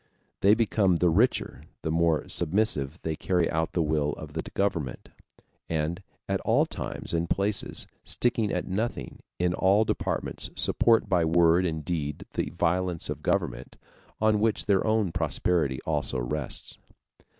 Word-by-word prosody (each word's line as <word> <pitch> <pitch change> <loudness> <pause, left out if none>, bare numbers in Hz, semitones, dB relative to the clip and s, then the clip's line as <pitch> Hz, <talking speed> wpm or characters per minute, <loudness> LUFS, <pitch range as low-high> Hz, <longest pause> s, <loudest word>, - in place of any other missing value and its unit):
They 100 +2 +5
become 105 -5 +2
the 85 0 +3
richer 110 +10 +1 0.2
the 80 - -1
more 80 -1 +2
submissively 85 -5 0
they 80 -1 -2
carry 90 0 +1
out 80 0 -1
the 85 - +1
will 75 -1 0
of 75 -1 -9
the 80 - -2
government; 85 -10 -2 0.6
and 80 +3 -1 0.3
at - - -1
all - - +3
times - - -3
and 85 0 0
places, 100 +1 0 0.2
sticking 115 -4 0
at - - -2
nothing, 110 +6 -3 0.2
in 90 0 +1
all 100 +4 +3
departments - - -2
support 115 -2 +3
by 90 -4 +2
word 85 +2 +4
and 80 -2 -4
deed 75 -5 -3
the - - -1
violence 90 0 0
of - - -5
government, - - -2 0.4
on 110 -1 +3
which 110 0 +1
their 100 -2 +3
own 110 -4 +2
prosperity 80 -3 0
also 75 -5 0
rests. 65 +3 -4
85 Hz, 150 wpm, -27 LUFS, 80-100 Hz, 0.6 s, They